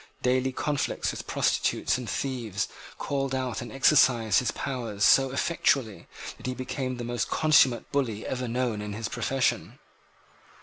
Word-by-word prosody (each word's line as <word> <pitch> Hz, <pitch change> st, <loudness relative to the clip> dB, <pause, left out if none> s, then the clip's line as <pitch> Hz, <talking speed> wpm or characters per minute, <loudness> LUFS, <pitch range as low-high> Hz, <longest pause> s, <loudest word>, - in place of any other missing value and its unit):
Daily 130 Hz, +1 st, +2 dB
conflicts 145 Hz, +2 st, -1 dB
with -, -, -8 dB
prostitutes -, -, +1 dB
and 125 Hz, -2 st, -5 dB
thieves 120 Hz, -7 st, -2 dB, 0.3 s
called 135 Hz, -1 st, -2 dB
out 130 Hz, -1 st, -2 dB
and 120 Hz, -2 st, -7 dB
exercised 125 Hz, -6 st, +4 dB
his 125 Hz, -, -1 dB
powers 115 Hz, -7 st, -2 dB
so 135 Hz, 0 st, +5 dB
effectually 135 Hz, -5 st, 0 dB, 0.3 s
that -, -, -8 dB
he 130 Hz, -, -2 dB
became 130 Hz, 0 st, -4 dB
the 120 Hz, -, -5 dB
most 120 Hz, 0 st, -2 dB
consummate 145 Hz, -6 st, +3 dB
bully 120 Hz, -7 st, -1 dB
ever 125 Hz, -1 st, -3 dB
known 120 Hz, -3 st, -1 dB
in 105 Hz, 0 st, -5 dB
his 110 Hz, +1 st, -4 dB
profession. 135 Hz, +3 st, -1 dB
125 Hz, 145 wpm, -27 LUFS, 115-135 Hz, 0.3 s, so